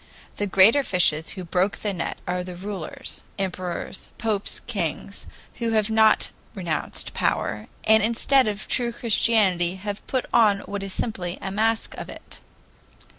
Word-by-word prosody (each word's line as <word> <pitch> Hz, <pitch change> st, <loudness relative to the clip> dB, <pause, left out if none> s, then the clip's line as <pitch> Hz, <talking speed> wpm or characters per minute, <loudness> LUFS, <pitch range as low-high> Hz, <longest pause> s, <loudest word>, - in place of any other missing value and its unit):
The 205 Hz, -, -1 dB
greater 200 Hz, +8 st, +7 dB
fishes 170 Hz, -, +2 dB
who 185 Hz, -, -4 dB
broke 180 Hz, +3 st, 0 dB
the 205 Hz, -2 st, -2 dB
net 170 Hz, -, -3 dB
are 180 Hz, 0 st, -1 dB
the 180 Hz, 0 st, -7 dB
rulers, 190 Hz, -2 st, -6 dB, 0.2 s
emperors, 185 Hz, -1 st, -4 dB
popes, 215 Hz, -3 st, -2 dB
kings, 195 Hz, -2 st, -4 dB, 0.3 s
who 230 Hz, -1 st, 0 dB
have 215 Hz, 0 st, +2 dB
not 220 Hz, 0 st, +4 dB, 0.3 s
renounced 175 Hz, -5 st, -3 dB
power, 105 Hz, -, -1 dB, 0.2 s
and 220 Hz, 0 st, +6 dB
instead 235 Hz, +4 st, +3 dB
of 210 Hz, 0 st, -3 dB
true 240 Hz, -2 st, 0 dB
Christianity 210 Hz, -6 st, +2 dB
have 200 Hz, +1 st, -5 dB
put 260 Hz, -2 st, -1 dB
on 210 Hz, -4 st, +5 dB
what 200 Hz, 0 st, -5 dB
is 195 Hz, 0 st, -5 dB
simply 185 Hz, -4 st, -2 dB
a 195 Hz, -, -5 dB
mask 220 Hz, +2 st, 0 dB
of -, -, -7 dB
it." -, -, -11 dB
200 Hz, 150 wpm, -24 LUFS, 180-220 Hz, 0.3 s, greater